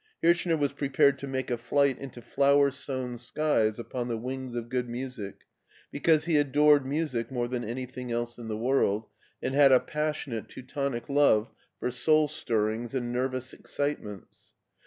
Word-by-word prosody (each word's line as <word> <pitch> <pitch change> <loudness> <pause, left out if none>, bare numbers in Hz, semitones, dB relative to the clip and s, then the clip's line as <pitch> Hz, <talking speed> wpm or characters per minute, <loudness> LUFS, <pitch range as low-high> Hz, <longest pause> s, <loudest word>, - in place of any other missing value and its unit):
Hirchner 170 0 +3
was 145 -2 0
prepared 140 -1 +2
to 140 - -6
make 130 -1 -3
a 120 - -1
flight 135 +2 +2
into 125 -3 -9
flower 140 +2 +3
sown 130 -3 -4
skies 120 -4 +1
upon 120 +1 -4
the 115 -2 -2
wings 130 +1 -5
of 120 -1 -3
good 125 0 -2
music, 120 -5 -5 0.5
because 155 +2 +2
he 165 -3 +3
adored 145 -1 +4
music 135 -6 -1
more 120 -2 -1
than 120 0 -3
any 125 +4 -4
thing 125 -1 -7
else 120 0 -2
in 115 - -7
the 110 -1 -3
world, 115 -3 +1 0.4
and 130 - -1
had 140 -1 +6
a 130 - +7
passionatef 150 -7 -3
Teutonic 130 -1 -4
love 140 -6 +3 0.3
for 125 - -1
soul 155 +5 +3
stirrings 115 -4 -2
and 120 -2 -2
nervous 130 0 -2
excitements. 110 - -5
130 Hz, 165 wpm, -28 LUFS, 120-140 Hz, 0.5 s, a